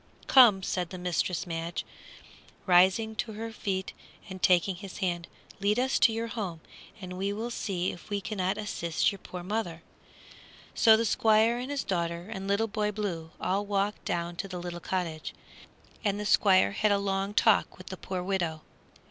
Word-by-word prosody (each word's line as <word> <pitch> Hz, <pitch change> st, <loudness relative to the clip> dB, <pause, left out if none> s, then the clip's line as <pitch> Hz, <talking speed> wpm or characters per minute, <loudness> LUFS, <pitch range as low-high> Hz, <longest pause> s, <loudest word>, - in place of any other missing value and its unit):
"Come," 230 Hz, -8 st, +7 dB
said 180 Hz, -2 st, -2 dB
Mistress 180 Hz, 0 st, -1 dB
Madge, 165 Hz, 0 st, -4 dB, 0.8 s
rising 190 Hz, +5 st, +4 dB
to 220 Hz, 0 st, -3 dB
her 225 Hz, +2 st, -5 dB
feet 190 Hz, -3 st, -3 dB, 0.3 s
and 190 Hz, -2 st, -8 dB
taking 180 Hz, +1 st, +3 dB
his 195 Hz, 0 st, -9 dB
hand; 175 Hz, -3 st, -2 dB, 0.3 s
"lead 205 Hz, +2 st, +1 dB
us 260 Hz, +1 st, +1 dB
to 230 Hz, -, +6 dB
your 225 Hz, +1 st, -2 dB
home, 205 Hz, -7 st, -4 dB, 0.4 s
and 180 Hz, -2 st, -7 dB
we 195 Hz, +1 st, 0 dB
will 225 Hz, +4 st, -4 dB
see 185 Hz, -5 st, -2 dB
if 175 Hz, -, -12 dB
we 205 Hz, -1 st, -1 dB
cannot 190 Hz, -2 st, -2 dB
assist 170 Hz, -6 st, 0 dB
your 200 Hz, -, -9 dB
poor 180 Hz, -1 st, -8 dB
mother." 180 Hz, -4 st, -3 dB, 0.9 s
So 220 Hz, -1 st, +6 dB
the 230 Hz, -, 0 dB
Squire 220 Hz, +2 st, +3 dB
and 255 Hz, +2 st, -5 dB
his 285 Hz, -1 st, -2 dB
daughter 170 Hz, +1 st, -2 dB
and 195 Hz, -2 st, -6 dB
Little 200 Hz, +3 st, +2 dB
Boy 210 Hz, -1 st, -1 dB
Blue 185 Hz, -6 st, -4 dB
all 195 Hz, +2 st, 0 dB
walked 205 Hz, 0 st, -1 dB
down 170 Hz, 0 st, -3 dB
to 195 Hz, -, -3 dB
the 185 Hz, -2 st, -6 dB
little 175 Hz, 0 st, -5 dB
cottage, 170 Hz, -3 st, -3 dB, 0.7 s
and 205 Hz, -2 st, 0 dB
the 210 Hz, -, -3 dB
Squire 190 Hz, -, +4 dB
had 210 Hz, -, +1 dB
a 200 Hz, -, +4 dB
long 195 Hz, 0 st, -2 dB
talk -, -, +3 dB
with -, -, -11 dB
the -, -, -4 dB
poor 185 Hz, -1 st, -5 dB
widow. 175 Hz, -5 st, -2 dB
195 Hz, 175 wpm, -29 LUFS, 175-215 Hz, 0.9 s, Come